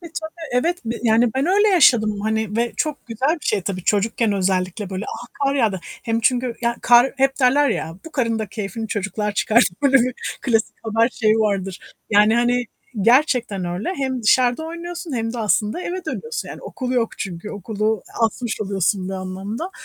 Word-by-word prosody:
E, 345 - -10
tabi 315 0 -7 0.2
evet 335 +9 +1
b 230 - -2
yani 230 0 +4
ben 270 +3 +1
öyle 410 +4 +4
yaşadım 225 - +4
hani 220 0 -1
ve 235 0 0
çok 300 -4 -2
güzel 240 +5 0
bir - - -12
şey 200 -3 +1
tabii, 185 -1 -4
çocukken 215 +1 +1
özellikle 190 0 -1
böyle. 190 +3 -4
"A! 240 - -7 0.2
Kar 275 0 +2
yağdı." 220 -8 +1
Hem 225 +6 -3
çünkü 245 +1 +1
ya 235 -1 0
kar 245 +2 +6
hep 270 +1 +1
derler 280 +3 +4
ya, 165 -8 -3
"Bu 325 - -9
karın 230 -5 0
da 220 - -3
keyfini 215 +2 -5
çocuklar 210 +1 -2
çıkarttı." 215 -2 +3
Böyle 275 -1 +5
bir 250 -1 +2 0.3
klasik 225 -4 +1
haber 225 +1 +2
şeyi 220 -3 +2
vardır. 195 -3 -1 0.3
Yani, 210 +1 +5
hani, 245 +1 +2 0.4
gerçekten 235 -4 +3
öyle. 180 - -3
Hem 260 -4 -2
dışarıda 245 +6 +3
oynuyorsun 340 0 -6
hem 225 0 -2
de 245 - -5
aslında 210 - +1
eve 365 0 -4
dönüyorsun. 465 0 -4
Yani, - - -9
okul 255 -1 -4
yok 240 -3 -1
çünkü, 185 0 -5
okulu 215 0 -2 0.2
asmış 225 0 -1
oluyorsun 195 -1 0
bir 195 - -4
anlamda. 195 - -5
225 Hz, 185 wpm, -21 LUFS, 205-255 Hz, 0.4 s, kar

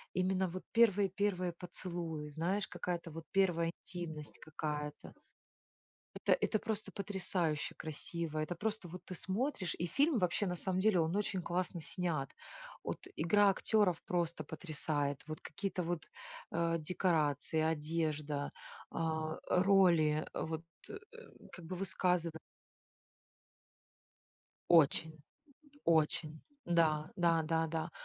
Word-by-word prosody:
именно 185 0 +2
вот 185 +2 -6
первые, 205 -4 +5
первые 185 -2 0
поцелуи, 170 -3 -5
знаешь, 175 +7 0
какая-то 175 -2 -3
вот 165 +1 -7
1 175 -4 +3 0.2
интимность 160 -5 -6
какая-то. 150 -1 -4 1.0
Это - - +1
это 220 - +1
просто 220 -1 -3
потрясающе 180 -6 -1
красиво, 160 +1 -4
это 155 +3 -1
просто 215 +1 -1
вот 180 +2 -8
ты 185 - -5
смотришь 190 - -1
и 175 - 0
фильм 280 - +3
вообще, 180 +2 +1
на 180 -1 -1
самом 185 +1 -1
деле, 205 -3 +4
он 165 +4 +1
очень 195 -3 0
классно 175 0 -1
снят. 155 -5 -2 0.5
От, - - -5
игра 200 +6 +5
актеров 195 -2 +2
просто 170 -3 -1
потрясает. 150 -3 -2
Вот 155 0 -5
какие-то 195 -2 -3
вот, 170 -1 -2 0.5
э, 170 0 +1
декорации, 160 -2 +1
одежда, 155 -2 -1 0.4
а, 160 -1 -1
роли 180 -5 +5
вот, 160 +1 -3 0.3
э, - - -5 0.6
как 175 - -9
бы 180 +3 -5
высказыва 180 -3 0 2.3
Очень, 160 0 +5 0.7
очень. 155 -1 +2 0.2
Да, 160 -3 +2
да, 170 -2 +4
да, 165 0 +1
да. 160 +1 -2
170 Hz, 120 wpm, -35 LUFS, 155-185 Hz, 2.3 s, первые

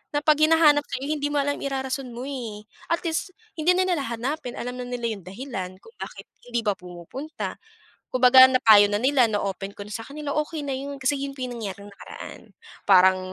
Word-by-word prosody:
na - - +3
'pag 305 -1 +4
hinahanap 310 -2 +5
ka, - - -4
eh, - - -3
hindi 290 -1 -1
mo 290 - +1
alam 285 +1 0
irarason 265 -1 -3
mo, 240 +2 -7
eh. 225 -6 -6 0.3
At 335 - +2
least 335 +3 -2 0.3
hindi 340 +4 +4
na 370 - +3
nila 335 -6 0
hahanapin, 250 +3 -4
alam 250 +1 -4
na - - -3
nila 245 -1 -3
yung 200 -5 -7
dahilan 195 -4 -6
kung 455 - -16
bakit - - -8 0.2
hindi 240 -1 -1
ba 205 - +1
pumupunta. 180 - -7 0.6
Kung 255 - -2
baga 260 +1 +10
napayo 220 -5 +7
na 205 - 0
nila, 260 -3 +4
na-open 200 -1 -3
ko 205 - -8
na 210 - -12
sa 225 - -5
kanila, 295 0 -6
okey 305 0 -2
na 275 -2 -2
yun. 280 0 -6
Kasi 275 +2 +1
yun 275 0 -4
po 260 - -7
nangyari 210 -5 -6
nung 205 - -11
nakaraan, - - -10 0.5
parang 190 -1 +6
255 Hz, 210 wpm, -25 LUFS, 210-285 Hz, 0.6 s, baga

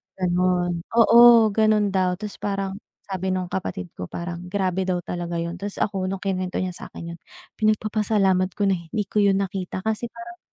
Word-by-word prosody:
isang - - -74
gano'n. 180 -1 +1 0.2
Oo, 235 -1 +8
gano'n 215 -1 +3
daw. 185 -1 +2
Tapos 210 0 -7
parang 195 -1 -2 0.4
sabi 190 0 -2
nung 185 -1 -2
kapatid 190 -1 -4
ko, - - -4
parang 175 0 -5
grabe 190 -1 0
daw 180 -1 +1
talaga 175 -1 -4
'yon. 170 +1 -4
Tapos 205 0 -5
ako 195 -3 -1
nung 195 -1 -5
kinuwento 185 -2 -2
niya 185 - -2
sa - - -8
akin 170 0 -7
yun, - - -13 0.4
pinagpapasalamat 210 -3 +1
ko 205 - 0
na 190 - +2
hindi 210 +6 -2
ko 210 - -1
'yon 200 -1 +3
nakita, 185 -1 -4
kasi 220 +2 -1
parang 350 +1 -10
190 Hz, 190 wpm, -23 LUFS, 180-210 Hz, 0.4 s, Oo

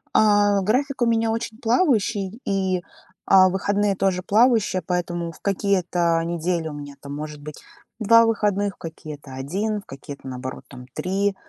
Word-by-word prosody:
Э, 205 -2 +4
график 260 +6 0
у - - +5
меня 225 -1 +2
очень 225 -1 -4
плавающий, 230 - +1
и, 190 -2 0
э, - - -16 0.7
выходные 200 +1 0
тоже 185 -1 0
плавающие, 215 -3 +3
поэтому 175 -1 -2
в - - -17
какие-то 180 -4 +1
недели 170 -1 -1
у 150 - -6
меня, 145 -1 -8
там, 140 +1 -8
может 150 0 -7
быть, 150 0 -9 0.4
2 230 +2 +6
выходных, 205 -3 0
в - - -40
какие-то 155 -4 -9
1, 200 +10 -2
в - - -25
какие-то, 135 0 -10
наоборот, 130 0 -6
там, 125 -2 -11
3, 195 +1 -1
190 Hz, 155 wpm, -23 LUFS, 165-215 Hz, 0.7 s, 2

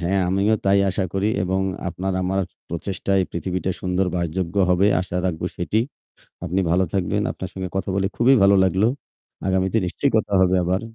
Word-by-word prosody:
হ্যাঁ, 95 +3 +1
আমিও 100 +4 +2
তাই 100 0 +4
আশা 95 +1 -1
করি 95 +1 0 0.2
এবং 95 +1 0 0.3
আপনার 95 +2 -3
আমার 95 +1 0 0.3
প্রচেষ্টায় 95 +3 -1
পৃথিবীটা 90 +2 -2
সুন্দর 90 0 0
বাসযোগ্য 85 +1 -2 0.2
হবে, 90 +3 +4
আশা 90 -1 -4
রাখবো 90 0 -2
সেটি। 95 +5 0 0.7
আপনি 90 +2 0
ভালো 90 +2 +3
থাকবেন, 100 +2 0
আপনার 95 - -6
সঙ্গে 95 -1 -4
কথা 95 - -2
বলে 95 0 +1
খুবই 130 +3 +5
ভালো 100 0 +6
লাগলো। 95 +4 +2 0.6
আগামীতে 95 +3 +1
নিশ্চয়ই 140 +9 -1
কথা 105 -2 0
হবে 95 0 +4
আবার। 90 +2 0
95 Hz, 170 wpm, -22 LUFS, 90-100 Hz, 0.7 s, ভালো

